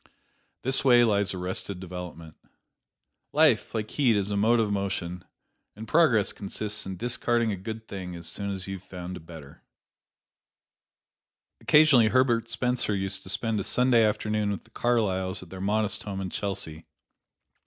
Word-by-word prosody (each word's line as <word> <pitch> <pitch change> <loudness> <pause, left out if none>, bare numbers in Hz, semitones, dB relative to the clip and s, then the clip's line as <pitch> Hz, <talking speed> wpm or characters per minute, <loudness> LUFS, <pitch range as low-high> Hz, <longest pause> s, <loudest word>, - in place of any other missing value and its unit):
This 130 +1 +1
way 120 -3 +6
lies 100 -3 +2
arrested 95 +1 -4
development. 90 -3 -8 1.0
Life, - - +3
like 110 -1 -3
heat, 130 -6 +3
is 100 0 -1
a - - 0
mode 115 +4 +3
of 110 -2 +1
motion, 90 -3 -3 0.5
and 110 +2 -9
progress 140 -11 +3
consists 105 0 -3
in 95 -1 -5
discarding 120 +1 0
a - - -1
good 110 +4 -7
thing 90 -3 -6
as 85 -1 -7
soon 100 +4 -4
as 95 -1 -3
you 95 0 -5
have 95 - -17
found 90 -1 -7
a - - -7
better. 80 -4 -12 2.0
Occasionally 150 -7 +6
Herbert 120 -2 +2
Spencer 125 -4 0
used 95 0 -2
to 95 - -9
spend 110 +1 -1
a - - -2
Sunday 125 0 +3
afternoon 105 -1 0
with 100 - -3
the - - -24
Carlyles 95 -6 0
at 85 - -15
their 95 -1 -7
modest 105 +1 0
home 100 -3 -5
in 95 -2 -4
Chelsea. 85 -6 -4
100 Hz, 160 wpm, -27 LUFS, 95-115 Hz, 2.0 s, way